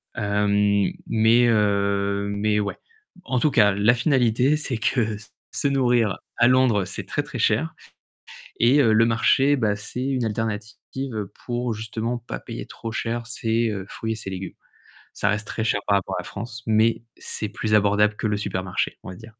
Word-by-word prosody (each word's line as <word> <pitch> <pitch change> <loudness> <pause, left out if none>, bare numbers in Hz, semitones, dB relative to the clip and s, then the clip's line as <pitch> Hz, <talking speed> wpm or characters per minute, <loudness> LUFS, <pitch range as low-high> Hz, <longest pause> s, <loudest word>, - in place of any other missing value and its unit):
hem, 100 -1 +2 0.2
mais 115 +2 +4
heu, 100 -2 +1
mais 105 +1 +1
ouais, 100 - -3 0.5
en 130 -2 0
tout 150 - +2
cas, 105 -4 +5
la 105 +4 +4
finalité, 125 +1 +2
c'est 130 -6 -3
que 120 +3 +1
s 110 +1 -13 0.2
se 140 - +1
nourrir 120 -7 +2 0.2
à 120 - +5
Londres, 125 -6 +3
c'est 100 - -6
très, 145 - -2
très 135 - -7
cher 125 +10 +1 0.8
et 125 +5 +5
heu, 110 -4 +4
le 115 +1 +5
marché, 135 +5 +3
bah, 105 -4 +1
c'est 110 +4 -5
une 130 -3 0
alternative 110 +1 -4 0.2
pour, 120 -1 -2
justement, 110 +2 -3
pas 120 - -7
payer - - -7
trop 115 - -7
cher 115 0 -3
ses, 115 0 0
heu, 100 -2 -4
fruits 110 0 -3
et - - -5
ses 100 -3 -6
légumes. 95 0 -6 0.6
Ça 100 - 0
reste 105 0 -1
très 110 - -3
cher 105 -2 +1
par 100 -1 +3
rapport 95 - -5
à - - -3
la - - -17
France, 115 +3 -7
mais 110 +1 +2 0.2
c'est 105 - -4
plus 105 0 -1
abordable 105 +1 +3
que - - -2
le 105 -1 0
supermarché, 95 -2 -2
on - - -7
va 90 - -9
dire. 110 +1 -13
110 Hz, 185 wpm, -23 LUFS, 105-120 Hz, 0.8 s, cas